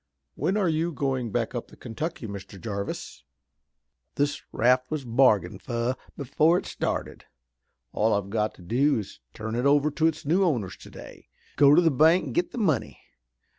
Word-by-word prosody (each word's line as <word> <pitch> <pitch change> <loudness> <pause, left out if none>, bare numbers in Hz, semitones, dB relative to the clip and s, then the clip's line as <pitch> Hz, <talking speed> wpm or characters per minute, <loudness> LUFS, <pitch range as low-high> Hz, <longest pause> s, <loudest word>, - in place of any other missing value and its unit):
When 180 +9 -1
are 200 -4 +2
you 165 +1 0
going 130 -6 -2
back - - -1
up - - -4
the - - -16
Kentucky, 155 +2 -5
Mr. 100 -2 -8
Jarvis?" 100 -9 -5 0.9
"This 145 0 0
raft 125 +2 +2
was 155 -4 -3
bargained 120 -3 +2
fur 120 +1 -1 0.2
before 155 +5 +2
it - - -4
started. - - -4 0.7
All 110 +1 +2
I've 100 -1 -3
got 110 -1 -1
to 90 - -15
do 130 +10 +2
is 105 - -6
to - - -40
turn 110 +1 -5
it 120 +4 +1
over 145 +1 +3
to 160 +2 +2
its 155 -2 -3
new 175 +7 +3
owners 120 - 0
today, - - -13 0.3
go 145 0 +6
to 175 - +6
the 165 - +4
bank 160 +6 +4
an' - - -6
get 350 0 0
the - - -9
money. 160 - 0
135 Hz, 180 wpm, -26 LUFS, 110-155 Hz, 0.9 s, go